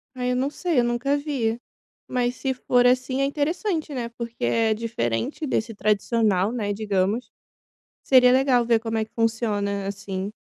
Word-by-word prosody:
Ai, 250 0 -1
eu - - 0
não 265 +3 0
sei. 330 -3 0
Eu - - +3
nunca 240 +4 0
vi, 245 -6 -2 0.5
mas 245 0 -1
se 265 -1 -2
for 245 0 +2
assim 255 +1 +1
é - - +3
interessante, 310 +3 -1
né, 235 -2 -3
porque 235 - -7
é 220 - +2
diferente 215 - -2
desse 225 -4 -1
tradicional, 210 -1 +1
né, 210 -4 -2
digamos. 205 +2 -1 0.7
Seria 250 -1 +6
legal 260 -2 +3
ver 230 -2 +3
como 225 0 -2
é 220 - 0
que - - -24
funciona 210 -3 -1
assim. 195 0 -5
235 Hz, 165 wpm, -24 LUFS, 215-255 Hz, 0.7 s, Seria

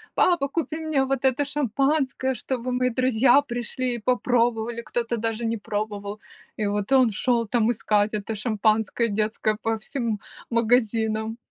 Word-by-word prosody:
"Папа, 345 -6 +3
купи 315 +1 -3
мне 315 -4 0
вот 270 0 -1
это 265 +2 +2
шампанское, 275 -1 0
чтобы 255 +1 -3
мои 250 0 +1
друзья 255 +2 +4
пришли 245 -1 -3
и - - -5
попробовали", 235 -1 +1
кто-то 235 0 -2
даже 225 +1 -2
не 225 0 -1
пробовал. 205 0 -4 0.4
И 215 - -1
вот 205 +3 -2
он 260 -3 +5
шёл, 235 +2 +1
там, 230 +1 +2
искать 210 -2 +1
это 215 +1 -3
шампанское 220 +1 +1
детское 215 +1 0
по 225 0 0
всем 225 -1 -3 0.3
магазинам. 225 -2 +1
235 Hz, 145 wpm, -24 LUFS, 220-255 Hz, 0.4 s, он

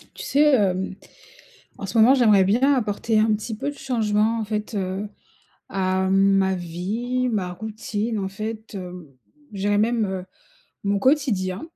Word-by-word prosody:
Tu - - -7
sais, 295 +1 +4
hem, 190 -4 +1 0.8
en - - -6
ce 195 +4 -3
moment, 240 +5 +7
j'aimerais 215 -7 +5
bien 255 +8 +3
apporter 220 -2 0
un 215 0 +3
petit 215 +1 -4
peu 285 - -2
de 290 - -7
changement 225 -3 0
en 220 - -2
fait, 215 +1 -4
heu, 195 +1 -3 0.6
à 190 0 0
ma 195 0 +3
vie, 210 +9 -2
ma 195 -6 -2
routine, 220 +2 -4
en 190 - -2
fait, 215 +3 -6
hem, 180 -2 -7 0.5
je 200 - -8
dirais 205 +1 +2
même, 225 +1 +2
heu, 190 -2 -4 0.6
mon 200 0 +1
quotidien. 205 -8 +1
210 Hz, 160 wpm, -23 LUFS, 190-230 Hz, 0.8 s, moment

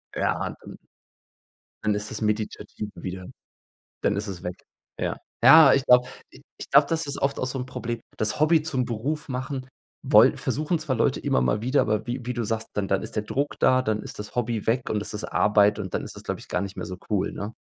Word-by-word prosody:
Ja, - - -1
dann - - -11 1.1
dann 105 -1 +2
ist 105 +1 -4
das 110 - -5
meditativ 105 0 -3
wieder 90 -1 -6 0.8
dann 105 - +1
ist 105 +2 -3
es 90 -3 -6
weg. 90 0 -4 0.4
Ja. - - -2 0.3
Ja, 135 +3 +9
ich 135 0 +1
glaube 125 0 +5 0.2
i - - -16 0.2
ich - - -9
glaube, 140 +1 +6
das 160 -2 -1
ist 140 - -3
oft 140 0 0
auch 130 - -1
so 130 +1 -4
'n 125 - -5
Problem. 120 -2 -4 0.2
Das 110 +6 0
Hobby 155 0 +4
zum 135 -5 -1
Beruf 135 +8 -3
machen 130 0 -4 0.4
woll - - +7
versuchen 155 +3 -1
zwar 155 -4 -2
Leute - - +2
immer 65 - +1
mal 65 - +1
wieder, 130 +4 +2
aber 110 +1 -1
wie 120 0 -4
wie 125 - -1
du 120 -1 -2
sagst, 110 +1 -2
dann 100 -2 -1
dann 95 - +1
ist - - -7
der 105 - +1
Druck 140 +6 -2
da, 130 0 +4
dann 110 -3 -1
ist - - -9
das 105 - -8
Hobby 115 -3 -2
weg 120 +2 +1
und 105 - 0
es - - -6
ist 105 - -4
Arbeit 105 0 +3
und 95 -4 -5
dann - - -1
ist - - -9
das, - - -9
glaube - - -4
ich, - - -14
gar - - -1
nicht 100 0 -6
mehr - - -5
so 90 - -6
cool, 100 -3 0
ne? 105 +3 -6
115 Hz, 235 wpm, -25 LUFS, 105-130 Hz, 1.1 s, Ja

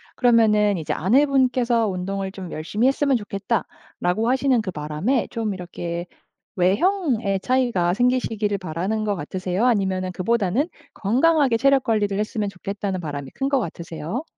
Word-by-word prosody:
그러면은 215 -4 +4
이제 160 - -2
아내분께서 250 - +2
"운동을 190 +1 -3
좀 190 -3 -8
열심히 205 +10 0
했으면 275 0 +2
좋겠다."라고 205 0 -2
하시는 260 -2 +2
그 205 - -5
바람에 155 - -1
좀 225 -3 -2
이렇게 175 -1 -5 0.5
외형에 220 - +1
차이가 235 -8 +1
생기시기를 225 -3 +1
바라는 185 +6 -2
것 205 - 0
같으세요? 185 +5 -2
아니면은 190 -6 +1
그보다는 215 - 0 0.3
'건강하게 265 +4 +3
체력 275 +1 +3
관리를 205 -3 +1
했으면 215 -1 -2
좋겠다'는 195 0 -4
바람이 145 -4 -5
큰 270 0 -1
것 275 - +2
같으세요? 170 - -5
210 Hz, 370 characters per minute, -23 LUFS, 185-250 Hz, 0.5 s, 그러면은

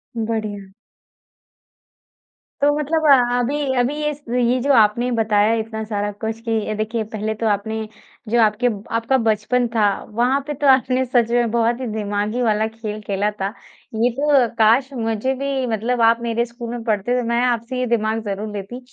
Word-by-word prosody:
बढ़िया। 215 -3 -3 1.9
तो 290 +1 +5
मतलब 315 +2 0
अ, 245 -3 +5
अभी 275 +2 -1
अभी 255 +4 +1
इस 295 0 -7
ये 245 +1 +1
जो 280 +2 +1
आपने 230 +2 +3
बताया 215 -1 +3
इतना 220 0 -4
सारा 205 -1 -2
कुछ 220 +2 -5
कि 220 -1 -1
देखिए 220 +1 -2
पहले 215 +1 -2
तो 225 - +1
आपने 220 +1 -1 0.4
जो 235 +1 +2
आपके 220 +3 +2 0.3
आपका 230 +4 +2
बचपन 235 +3 +1
था 220 - +3 0.3
वहाँ 245 +5 +1
पे 295 - -2
तो - - +4
आपने 260 0 +3
सच 240 -2 +2
में 240 -2 +2
बहुत 235 +1 +1
ही 250 - -3
दिमागी 210 +2 -2
वाला 220 -1 +1
खेल 220 -1 -6
खेला 205 0 -1
था। 195 +2 -2 0.4
ये 235 +3 +2
तो 285 -5 +4
काश 230 +5 +4
मुझे 225 +2 -1
भी 275 -1 -2
मतलब 230 +2 -1
आप 230 +1 +4
मेरे 235 0 0
स्कूल 235 0 -8
में 240 -1 -5
पढ़ते 230 +3 0
तो 230 - -4
मैं 235 +1 +1
आपसे 245 +1 -1
ये 255 - 0
दिमाग 220 0 -2
ज़रूर 205 +1 -3
लेती 205 +6 -6
230 Hz, 175 wpm, -20 LUFS, 215-250 Hz, 1.9 s, तो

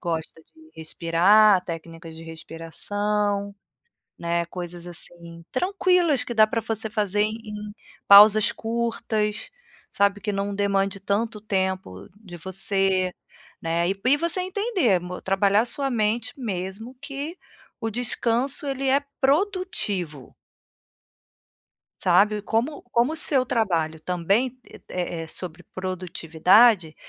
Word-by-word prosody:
gosta 165 -2 -4
de 320 - -22
respirar, 180 +5 +4
técnicas 165 -1 -8
de 165 - -10
respiração, 200 +5 -3 0.6
né, 170 0 -1
coisas 175 0 -8
assim 170 -1 -7
tranquilas 360 -4 +2
que 240 - -5
dá 215 -1 +6
pra 230 - -1
você 220 0 -4
fazer 205 -2 0
em 210 -1 -6 0.4
pausas 210 +1 +8
curtas, 225 -2 -2 0.4
sabe, 200 0 +1
que 210 0 -3
não 200 0 -2
demande 195 0 0
tanto 210 +3 -2
tempo 190 - -3
de 200 -5 -12
você, 190 +1 0 0.5
né, 170 +1 0
e 195 - -1
e 275 - +5
você 335 +3 +1
entender, 375 - +1
mo 180 +1 -7
trabalhar 200 +2 +2
sua 275 +3 +1
mente 225 -1 -1
mesmo 210 +2 -5
que 280 +4 -6 0.4
o 225 - -2
descanso, 245 +5 0
ele 270 -1 -2
é 275 +2 +4 0.2
produtivo. 270 - -1 1.7
Sabe, 205 +4 +3
como 235 +8 -2
como 240 +6 +2
o - - -5
seu 270 -4 +4
trabalho 170 -10 -1
também, 195 +10 -1 0.3
é 175 -2 -3
é - - -10
sobre 175 +1 -8
produtividade, 185 +1 +2
205 Hz, 115 wpm, -24 LUFS, 180-235 Hz, 1.7 s, pausas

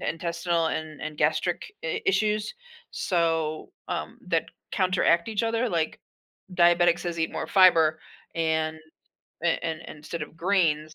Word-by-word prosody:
in - - -2
intestinal 170 0 -1
and 155 -1 -4
and 155 -1 -6
gastric - - +1 0.2
i 450 -3 -1
issues, 215 - +1 0.4
so, 165 -3 -1 0.2
um, - - -4
that - - +1 0.2
counteract 185 -3 +2
each 220 0 -1
other 230 +2 0
like, 165 -5 -1 0.6
diabetics 175 0 +5
says 175 -1 -4
eat 160 - 0
more - - -3
fiber, 165 -5 +5 0.4
and 160 -1 0 0.7
a 170 - +4 0.2
and 160 -1 -2
and - - -9
instead 155 +2 -6
of 150 - -9
greens, 165 -4 +1
170 Hz, 145 wpm, -26 LUFS, 160-185 Hz, 0.7 s, diabetics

